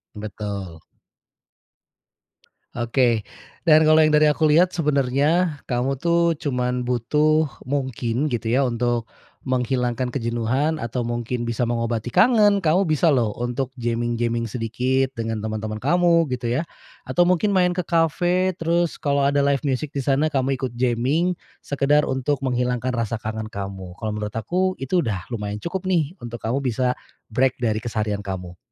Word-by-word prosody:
Betul. 100 -4 -6 1.9
Oke, 120 -1 +1 0.5
dan 155 0 +7
kalo 155 0 +6
dari 150 0 +5
yang 150 - +4
aku 155 -1 +2
liat 175 +4 +4
sebenarnya, 150 +2 +1
kamu 130 +2 -1
tuh 170 0 +3
cuman 125 -4 -1
butuh 150 +6 +2 0.2
mungkin 130 -1 -2
gitu 120 -6 -2
ya, 140 - +3
untuk 120 -1 0 0.4
menghilangkan 125 -1 0
kejenuhan 125 +5 -1
atau 120 +1 -3
mungkin 120 0 -3
bisa 115 +1 -2
mengobati 115 0 -1
kangen, 205 - +4
kamu 165 +5 +4
bisa 155 +1 +3
loh 120 -5 +2
untuk 120 +2 -2
jamming-jamming 120 -1 -1
sedikit 125 +4 -1
dengan 115 -2 -3
teman-teman 110 0 -3
kamu, 170 +6 +3
gitu 120 -2 -3
ya. 135 +8 0 0.4
Atau 175 0 +2
mungkin 185 +3 +2
main 180 -2 +4
ke 180 -1 -2
kafe 175 +2 +1
terus 170 +1 0
kalo 140 -1 0
ada 140 0 +2
live 140 -1 +2
music 140 0 -2
di 140 - -1
sana 140 +3 +1
kamu 135 0 +1
ikut 125 -2 -4
jamming, 130 +9 +1 0.2
sekedar 145 +1 +2
untuk 130 +2 -1
menghilangkan 125 -1 -1
rasa 115 -3 -2
kangen 110 0 -4
kamu. 95 -2 -6
Kalo 110 - -2
menurut 105 0 -4
aku 185 - 0
itu, 175 +7 +1
udah 100 -6 -3
lumayan 105 -3 -4
cukup 185 +2 -4
nih, 175 -2 0
untuk 120 -5 -8
kamu 115 +4 -1
bisa 125 +1 0 0.3
break 130 +3 +2
dari 110 -2 +1
keseharian 110 -3 -3
kamu. 90 -2 -6
130 Hz, 150 wpm, -23 LUFS, 115-155 Hz, 1.9 s, dan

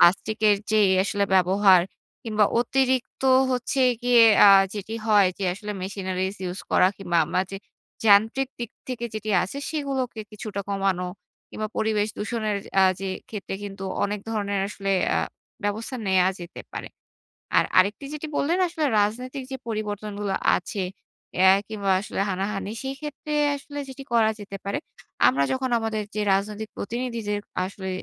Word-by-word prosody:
প্লাস্টিকের 210 +3 +4
যেই 210 -3 +4
আসলে 205 0 0
ব্যবহার 190 0 +5 0.4
কিংবা 215 -2 +2 0.2
অতিরিক্ত 260 +1 0 0.3
হচ্ছে 250 +2 -1 0.2
গিয়ে 245 -1 +6 0.2
আ - - +9 0.3
যেটি 210 +2 -5
হয় 205 -3 +5
যে 200 - -2
আসলে 210 +2 -6
machineries 190 0 -3
use 180 - -7
করা 180 - +5
কিংবা 175 -3 -2
আমরা 170 +3 0
যে, 195 - -5 0.5
যান্ত্রিক 225 +6 +4
দিক 235 -2 -5 0.2
থেকে 245 -2 -4
যেটি 215 0 -3
আছে, 195 +10 -5
সেগুলোকে 270 -6 -2
কিছুটা 210 -1 -5
কমানো 195 -2 0 0.4
কিংবা 215 - -3
পরিবেশ 215 -1 +1
দূষণের 215 -1 -1 0.2
আ - - +7 0.2
যে 195 - -3 0.2
ক্ষেত্রে 200 -3 -5
কিন্তু 195 -1 -7 0.2
অনেক 205 0 -2
ধরনের 200 -3 -1
আসলে 195 -1 -2 0.2
আ - - +3 0.5
ব্যবস্থা 220 +5 -2
নেয়া 190 -1 +4
যেতে 175 0 -8
পারে। - - -6 0.7
আর - - +5
আরেকটি 200 +9 +3
যেটি 300 +1 -5
বললেন, 335 +6 +1
আসলে 325 -2 -2
রাজনৈতিক 250 +6 -1
যে - - -2
পরিবর্তন 210 -1 -3
গুলো 200 -2 -1 0.2
আছে, 190 +2 -3 0.5
অ্যা 190 +1 +7 0.2
কিংবা 205 -3 -1
আসলে 205 - -3
হানাহানি, 195 +2 -2
সেইক্ষেত্রে 295 +2 -5 0.2
আসলে 285 +1 -8
যেটি 270 +1 -8
করা 225 -2 +4
যেতে 200 -1 -7
পারে, 200 - -1 0.5
আমরা 140 +2 +3
যখন 260 0 -1
আমাদের 220 -1 -2
যে 210 - 0
রাজনৈতিক 210 +2 -2
প্রতিনিধিদের 230 -3 -3 0.3
আসলে 190 0 -6
210 Hz, 150 wpm, -25 LUFS, 195-235 Hz, 0.7 s, আ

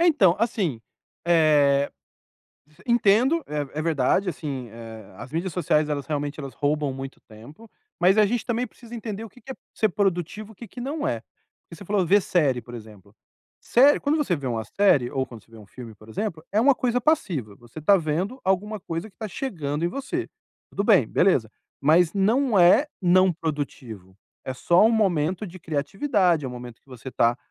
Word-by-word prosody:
É, 345 - +4
então, 195 - +4
assim, 205 - -1 0.5
eh, 150 -4 +4 1.0
entendo. 240 +7 +3
É 150 -1 -4
é - - -2
verdade, 160 +4 +1
assim, 140 -7 -5
eh, 110 -3 -11
as 125 - -10
mídias 170 +3 -2
sociais, 155 -3 +1
elas 145 -2 -3
realmente, 145 -1 -3
elas 135 -3 -7
roubam 145 -1 -1
muito 135 +1 -8
tempo. 125 - -15 0.3
Mas 185 +3 +4
a 215 - +6
gente 225 +2 -1
também 240 0 0
precisa 235 +1 -14
entender 220 -2 -5
o - - -9
que 245 - -20
que 255 - -12
é - - -4 0.2
ser 215 - +2
produtivo, 200 +2 -2
o - - -19
que 230 +3 -11
que 245 - -10
não 290 +4 -3
é. - - -2 0.5
Porque - - -11
você 200 - -11
falou: 195 -1 0
"Ver 205 +5 +5
série", 140 -10 +1
por 120 +2 -12
exemplo. 105 -3 -12 0.5
Série 275 +4 +4
quando 285 +1 0
você 275 - 0
vê 140 -3 -7
uma 115 -3 -2
série 145 - +2
ou 130 -1 -2
quando 115 -4 -12
você - - -31
vê 115 - -14
um 105 - -14
filme, 120 +1 -11
por 110 +1 -18
exemplo, 160 - -4
é 215 - +3
uma 275 +3 +5
coisa 250 0 0
passiva. 180 - 0
Você 120 +5 -12
tá 200 +6 +5
vendo 180 - -2
alguma 205 +3 0
coisa 180 +1 -6
que - - -40
tá 220 - -5
chegando 170 - -4
em - - +2
você. 275 - -4 0.4
Tudo 200 - -2
bem, 200 - +5
beleza. 135 - +2 0.3
Mas 160 +4 +4
não 225 +4 +2
é 180 +12 +6 0.2
não 185 +1 +4
produtivo. 135 - -6 0.3
É 130 - -4
só 175 +9 +3
um 225 - +5
momento 185 -3 +1
de 185 0 -11
criatividade. 170 - 0
É - - -2
um - - -7
momento 120 -2 -10
que - - -49
você 125 0 -9
tá, 120 0 +2
170 Hz, 200 wpm, -24 LUFS, 135-215 Hz, 1.0 s, a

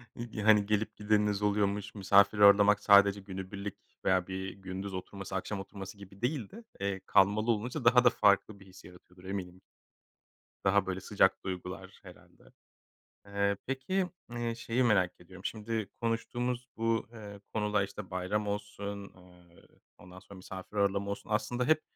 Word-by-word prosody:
ig 115 -3 -6
hani, 105 -2 +6
gelip 105 +1 0
gideniniz 105 -1 +1
oluyormuş, 105 0 0
misafir 100 +1 +4
ağırlamak 105 0 +7
sadece 100 0 +6
günübirlik 95 +1 -6 0.3
veya 95 -1 +2
bir 95 0 -4
gündüz 95 0 -6
oturması, 95 +1 -6
akşam 95 +1 -3
oturması 95 0 -8
gibi 100 0 -14
değil 125 -3 -1
de, 230 +3 -12 0.2
eee, 100 -1 -2
kalmalı 105 +4 +4
olunca 115 +3 -3
daha 125 +1 +6
da 120 - +7
farklı 100 -2 +2
bir 100 - -15
his 95 -1 -15
yaratıyordur 90 0 -16
eminim. 95 -2 -5 1.0
Daha 100 0 +3
böyle 95 0 -3
sıcak 95 0 +2
duygular 90 -1 -6
herhâlde. - - -16 0.8
Eee, 100 0 0
peki, 180 +9 -1 0.2
eee, 120 -1 -2
şeyi 115 +2 -1
merak 90 -6 +2
ediyorum, 95 +2 -14
şimdi 110 -1 -3
konuştuğumuz 120 +2 -2
bu, 115 0 0
eee, 105 -3 -10
konuda, 105 -2 +1
işte, 100 0 -8
bayram 95 +3 -1
olsun, 100 0 -4 0.2
ııı, 90 -1 -19 0.4
ondan 90 +1 -13
sonra 100 0 -13
misafir 95 +2 -9
ağırlama 100 0 +1
olsun 100 +1 -6
aslında 120 +3 0
hep, 155 +3 +3
100 Hz, 150 wpm, -31 LUFS, 95-110 Hz, 1.0 s, ağırlamak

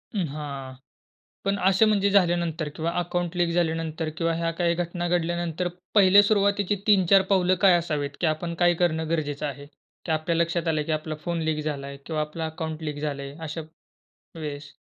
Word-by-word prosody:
उम्म, 185 -5 0
हां. 140 -3 -6 0.7
पण 195 0 +1
असे 195 +3 +4
म्हणजे 200 -2 +3
झाल्यानंतर 170 -4 +2
किंवा 165 +1 -1
अकाउंट 175 0 -2
लीक 175 -1 +2
झाल्यानंतर 165 -1 -1
किंवा 165 +1 0
ह्या 165 0 0
काही 170 -1 +3
घटना 175 0 -2
घडल्यानंतर, 175 0 -1 0.3
पहिल्या 200 0 +7
सुरुवातीची 205 -1 +2
3-4 195 -2 +5
पावलं 185 -1 +4
काय 185 -2 +7
असावीत, 150 -4 -2
की 175 - +2
आपण 165 +2 -1
काय 175 0 +5
करणं 160 -2 +1
गरजेचं 150 -2 -1
आहे? 140 0 -6 0.4
की 160 - -1
आपल्या 160 +2 0
लक्षात 170 0 0
आलं 155 -2 +1
की 160 - -1
आपला 155 0 -2
फोन 170 -1 -1
लीक 155 -1 -1
झालाय 140 -2 -4
किंवा 155 -2 -2
आपलं 155 +2 -5
अकाउंट 160 0 -5
लीक 150 -1 -4
झालंय 140 -2 -4
अशा 160 +1 -5 0.8
वेळेस? 145 -2 -6
165 Hz, 175 wpm, -25 LUFS, 155-175 Hz, 0.8 s, पहिल्या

